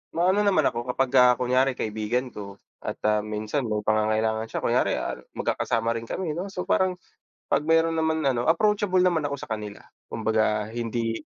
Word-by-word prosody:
maano 185 +4 +3
naman 185 -6 +3
ako 120 +1 -4
kapagka 125 -1 +5
kunyari 130 +2 +1
kaibigan 110 +4 -2
ko 100 -1 -8 0.2
at, - - -5
ah, 105 0 +3
minsan 105 +5 -3
may 105 -1 -2
pangangailangan 110 +1 +1
siya, - - -5
kunyari, - - +2
ah, - - -4 0.2
magkakasama 115 0 0
rin 115 - -10
kami 170 +2 -3
'no, 175 +5 -4
so 190 -2 -5
parang 185 -1 +1 0.5
'pag 145 +2 +1
meron 165 0 +3
naman 160 0 +1
ano, 120 -2 -1
approachable 200 +2 +2
naman 170 -4 +2
ako 140 -1 -3
sa - - -9
kanila. 105 -2 -5 0.2
Kumbaga, 110 -1 0
hindi 115 0 -2
125 Hz, 170 wpm, -25 LUFS, 110-160 Hz, 0.5 s, kapagka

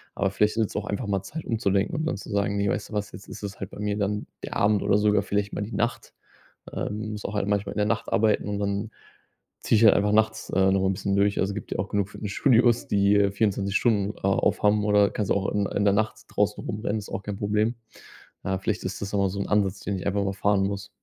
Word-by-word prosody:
aber 95 - +1
vielleicht 105 +2 +1
ist 110 - +3
es - - -12
auch 105 +1 -2
einfach 105 +2 -3
mal 100 -2 0
Zeit 155 +10 -7
umzudenken 105 - 0
und 155 +1 -1
dann 160 - -1
zu 100 - -10
sagen: 100 -1 0
„Ne, 100 - +1
weißt - - -2
du - - -11
was, 105 0 -2
jetzt 100 - -11
ist - - -9
es 100 -1 -6
halt 95 - -5
bei - - -11
mir 105 0 -1
dann 105 0 -1 0.2
der - - -4
Abend 105 0 +3
oder 100 - +3
sogar 105 -1 +3
vielleicht 100 0 -2
mal - - -3
die 105 +3 -5
Nacht.“ 120 +1 -2 0.6
Ähm, 105 +1 -4
muss 105 - -7
auch 105 - -4
halt 100 -1 -1
manchmal 100 -1 0
in - - -6
der 105 - +2
Nacht 115 0 -2
arbeiten 105 -1 +2
und 100 -1 -2
dann 100 +2 -2 0.7
ziehe - - +2
ich 115 - +4
halt 105 - +8
einfach 105 +1 +2
nachts, 110 0 +1
äh, 95 0 +3
nochmal 95 0 +2
'n - - +1
bisschen 100 0 -1
durch. 100 0 +2
Also, 95 +1 -1
gibt 105 - -7
ja - - -2
auch 95 - -3
genug 100 -1 0
Fitnessstudios, 120 +3 +2
die, 100 0 +3
äh, 100 -1 +3
24 100 -1 0
Stunden 105 -4 +1
a 95 - -1
aufhaben 105 +1 +2
oder 105 -1 +4
kannst 105 -3 -2
ja - - 0
auch 95 - -1
in 100 -1 0
in 100 - -1
der 100 -1 +4
Nacht 110 +1 0
draußen 105 0 0
rumrennen, 105 0 -2
ist 105 - -8
auch 100 - -4
kein 100 -1 -4
Problem. 105 +3 0 0.7
Äh, 95 0 -1
vielleicht 100 0 -2
ist 95 +1 -4
das 100 - -3
ja 100 - +1
mal 100 -1 +2
so 100 - -4
'n - - -3
Ansatz, 100 -2 +1
den 100 -2 -3
ich - - -7
einfach 100 0 +1
mal 95 0 -2
fahren 100 0 +2
muss. 100 0 -4
100 Hz, 270 wpm, -26 LUFS, 100-105 Hz, 0.7 s, halt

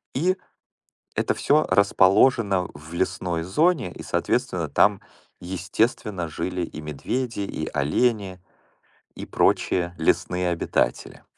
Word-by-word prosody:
И 180 +7 +1 0.8
это - - +1
всё 150 +2 +2
расположено 100 -1 +4
в 75 +3 -12
лесной 85 -1 -1
зоне 130 - +1
и, - - -10
соответственно, - - -1
там, - - +3 0.4
естественно, 95 +1 -1
жили 90 +3 -3
и 80 - -7
медведи, 110 - -3
и 95 -5 -4
олени, 95 - 0 0.8
и - - -7
прочие 90 -1 +1
лесные 90 +2 +1
обитатели. 85 -7 -1
95 Hz, 105 wpm, -24 LUFS, 85-115 Hz, 0.8 s, расположено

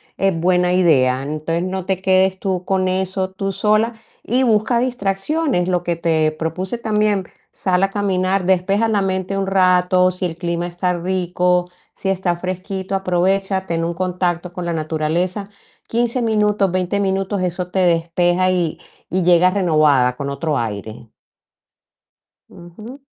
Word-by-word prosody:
es 195 -4 0
buena 180 +1 +2
idea. 135 -8 +3
Entonces, 155 +4 -2
no 185 0 -3
te 190 -2 +1
quedes 190 0 +2
tú 185 -2 -2
con 190 -1 +1
eso 190 0 -1
tú 195 +1 -3
sola, 215 +4 +1 0.3
y 255 +3 +1
busca 225 +1 +2
distracciones, 245 - -1
lo 180 -1 +1
que 175 -1 -2
te 160 -2 +1
propuse 165 +8 -4
también, 210 -4 0 0.3
sal 180 -1 0
a 195 - +2
caminar, 190 -2 0
despeja 190 +4 +2
la 210 -2 +1
mente 190 0 -2
un 195 - -2
rato, 185 -1 +3
si 180 0 -2
el 165 - -8
clima 170 0 -2
está 180 +1 -1
rico, 180 0 0 0.2
si 195 - -3
está 185 -2 0
fresquito, 185 +2 -5
aprovecha, 190 +1 0
ten 165 -2 -2
un 170 +1 -2
contacto 180 -1 -2
con 180 -1 -5
la 170 - -1
naturaleza, 165 +5 -2 0.4
15 240 +2 0
minutos, 210 -3 +2
20 185 +2 -1
minutos, 195 0 -1
eso 180 0 -3
te 190 - 0
despeja 175 +1 +2
y 175 -4 -1 0.3
y 185 0 0
llegas 180 +1 +4
renovada, 155 -9 +3
con 140 -1 -4
otro 145 +2 -2
aire. 110 +1 -6 1.4
Ujú. 210 +10 -12
185 Hz, 150 wpm, -19 LUFS, 175-195 Hz, 1.4 s, llegas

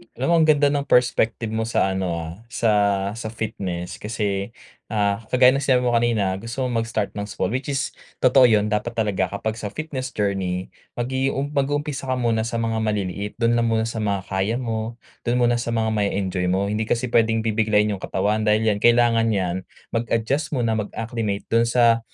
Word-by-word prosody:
Alam - - -2
mo - - +5
ang 160 - +4
ganda 145 -2 +4
ng 140 -1 -1
perspective 115 -3 +2
mo 110 0 -1
sa 95 -4 +1
ano, 95 -1 -1
ah, 80 -1 -5
sa 115 -1 0 0.4
sa 110 +1 -6
fitness 95 -6 -5
kasi, 105 -1 -2 0.3
ah, 100 -2 0
kagaya 125 0 +5
ng 135 - 0
sinabi 130 -2 +3
mo 125 - +2
kanina 110 -5 +1
gusto 120 +5 -4
mong 120 -2 0
mag-start 110 -3 -2
ng 105 0 -5
sport 95 -1 -2
which 130 +2 -3
is 140 -1 -1 0.3
totoo 130 0 +7
'yun 105 -2 +2
dapat 110 +3 -1
talaga 100 -4 0
kapag 110 +4 -4
sa 105 - -4
fitness 130 0 -5
journey 95 -3 -1 0.2
mag-i-um 135 +3 -1
mag-uumpisa 145 -1 -1
ka 130 - +1
muna 115 -2 0
sa 115 - -4
mga 115 -1 -1
maliliit 105 -2 -2
do'n 120 0 +2
lang 115 0 +2
muna 110 -1 +1
sa 115 0 -3
mga 100 -2 0
kaya 95 +4 0
mo, 115 -2 -3 0.3
do'n 120 - +2
muna 120 0 +3
sa 115 -1 -2
mga 110 0 +1
ma-e-enjoy 100 -3 -1
mo. 95 +3 0
Hindi 110 +1 -1
kasi 120 0 -1
puwedeng 115 -1 +3
bibiglain 105 -1 +2
yung 100 - -4
katawan, 105 +3 -1
dahil 105 +1 +3
yan 105 -2 +1
kailangan 120 0 +4
yan 95 -1 -1 0.3
mag-adjust 115 +6 -1
muna 115 -3 +1
mag-acclimate 110 -1 -3
do'n 115 +1 +4
sa 115 -1 +4
115 Hz, 190 wpm, -23 LUFS, 105-120 Hz, 0.4 s, totoo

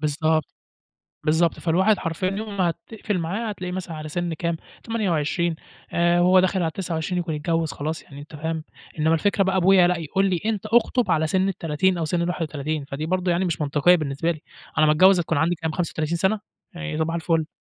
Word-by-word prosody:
بالضبط 155 +1 +1 0.8
بالضبط 160 +2 +2
فالواحد 190 +5 +3
حرفيًا 165 +2 -2
يوم 205 +1 -5
ما 180 -3 +2
هتقْفل 210 +1 -4
معاه 200 +7 -2
هتلاقيه 180 -3 -5
مثلًا 180 -2 -5
على 155 0 -6
سِن 175 +2 -2
كام 170 +1 -2 0.3
28 170 - 0 0.4
آآ، 175 0 +3
وهو 185 +1 +6
داخل 185 +1 +1
على 170 - +1
ال29 165 +1 -3
يكُون 165 -3 -3
اتجوز 165 +1 -1
خلاص 155 +2 -4
يعني 140 0 -12
أنت 150 +1 -11
فاهم؟ 160 +1 -3 0.3
إنما 160 +2 +3
الفكرة 200 +5 +2
بقى 190 0 +1
أبويا 185 0 +5
لأ، 180 -1 +1
يقول 165 +5 0
لي 180 -2 0
أنت 215 -2 -1
أخطب 235 -1 +2
على 160 -1 +2
سِن 190 +4 +1
ال30 175 0 0
أو 165 - -1
سِن 170 +2 0
ال31 155 -4 -2
فدي 140 +3 -5
برضه 185 +1 0
يعني 175 +2 +1
مش 170 -4 -2
منطقية 150 +4 +4
بالنسبة 155 +1 -1
لي، 160 -3 -4 0.4
على 155 - +5
ما 150 - +5
اتجوز 185 +3 +6
هتكُون 160 -2 0
عندي 165 +4 +2
كام 160 -1 -3
35 165 -1 -2
سَنة 190 +5 +1 0.3
يعني 170 -2 -4
صباح 160 +1 0
الفل. 165 -1 0
170 Hz, 200 wpm, -23 LUFS, 155-185 Hz, 0.8 s, وهو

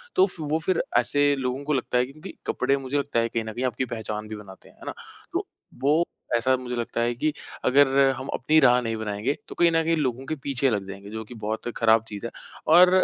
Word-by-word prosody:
तो 375 - +6
फ 165 - -4
वो - - +4
फिर 180 +1 +1 0.2
ऐसे 145 +4 +3
लोगों 130 +1 -2
को 150 - 0
लगता 125 -2 0
है 125 - +3
क्योंकि 155 +8 -10
कपड़े 140 0 +1
मुझे 135 +1 -2
लगता 140 -4 0
है 115 0 +1
कहीं 115 0 -1
न 110 - -5
कहीं 125 +3 -2
आपकी 130 +1 -1
पहचान 110 -2 -5
भी 110 - -6
बनाते, 100 -2 -12
हैं - - -16
ना? - - -4 0.4
तो, - - -1 0.3
वो 150 +5 +4 0.3
ऐसा 130 +3 +3
मुझे 125 -1 -5
लगता 115 0 -2
है 120 +1 +1
कि 155 +5 +1 0.3
अगर 140 +2 +6 0.3
हम 130 - -6
अपनी 155 +4 +3
राह 125 -3 +6
नहीं 115 -1 -2
बनाएँगे, 110 +5 -1
तो - - -9
कहीं 170 -1 +4
न 165 0 +3
कहीं 165 +1 +2
लोगों 130 -3 -1
के 155 - -2
पीछे 135 -1 +1
लग 100 -4 -1
जाएँगे, 100 +1 -8
जो 110 +1 -5
कि 110 - -12
बहुत 110 +1 -4
खराब 115 -1 +4
चीज़ 105 0 -7
है। 115 - -4 0.4
और 180 +2 +9
125 Hz, 240 wpm, -25 LUFS, 110-145 Hz, 0.4 s, और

